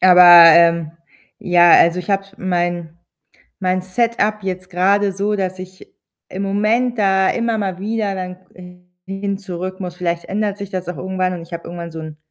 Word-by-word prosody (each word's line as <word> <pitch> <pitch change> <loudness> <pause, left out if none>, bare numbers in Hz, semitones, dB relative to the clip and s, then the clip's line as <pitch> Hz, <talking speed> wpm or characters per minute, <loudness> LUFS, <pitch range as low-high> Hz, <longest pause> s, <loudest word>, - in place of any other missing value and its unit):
Aber, 180 -1 +6 0.3
ähm, 170 -1 +3 0.5
ja, 175 -1 +4
also, 170 +2 +5
ich 180 +3 -6
habe 195 0 0
mein 175 -2 -3 0.6
mein 185 -1 -1
Setup 215 +2 -1
jetzt 185 -1 -5
grade 195 +3 +1
so, 205 +2 -2
dass 185 -1 -4
ich 185 0 -12 0.4
im 190 +2 -5
Moment 220 +5 0
da 190 -1 +2
immer 230 -1 -1
mal 190 -3 -3
wieder 210 -1 -3
dann 180 -1 -6 0.7
hin 195 +1 -4
zurück 185 -1 -7
muss. 180 -1 -7
Vielleicht 170 -2 -3
ändert 205 0 -3
sich 200 -2 -8
das 185 -2 -5
auch 175 - -5
irgendwann 185 0 -2
und 175 - -7
ich 170 - -17
habe 170 - -6
irgendwann 170 -1 -8
so 160 - -8
'n 155 -1 -9
185 Hz, 175 wpm, -18 LUFS, 175-200 Hz, 0.7 s, Aber